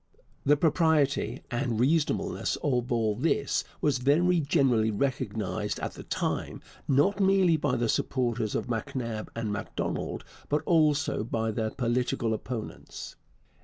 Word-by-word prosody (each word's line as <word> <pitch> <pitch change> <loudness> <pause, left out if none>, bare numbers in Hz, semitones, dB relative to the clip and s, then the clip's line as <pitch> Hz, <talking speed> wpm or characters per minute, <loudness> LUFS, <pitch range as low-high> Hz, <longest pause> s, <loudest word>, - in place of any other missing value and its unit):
The 145 +1 +6
propriety 155 -3 +2
and 120 -2 -1
reasonableness 165 +8 +1
of 125 -5 0
all 110 -3 +1
this 140 +9 +1 0.2
was 140 -4 +2
very 170 +7 +3
generally 135 -7 +2
recognized 110 -3 -2
at - - -4
the - - -9
time, - - -2 0.3
not 145 +9 +3
merely 190 -3 +4
by 155 - 0
the 120 0 0
supporters 120 -2 0
of - - -1
MacNab 115 -1 -3
and 110 -2 -2
Macdonald, 100 - -3 0.3
but 150 +1 +1
also 150 -6 +2
by 110 0 -1
their 110 0 -1
political 120 -1 0
opponents. 115 0 -6
130 Hz, 130 wpm, -28 LUFS, 115-150 Hz, 0.3 s, The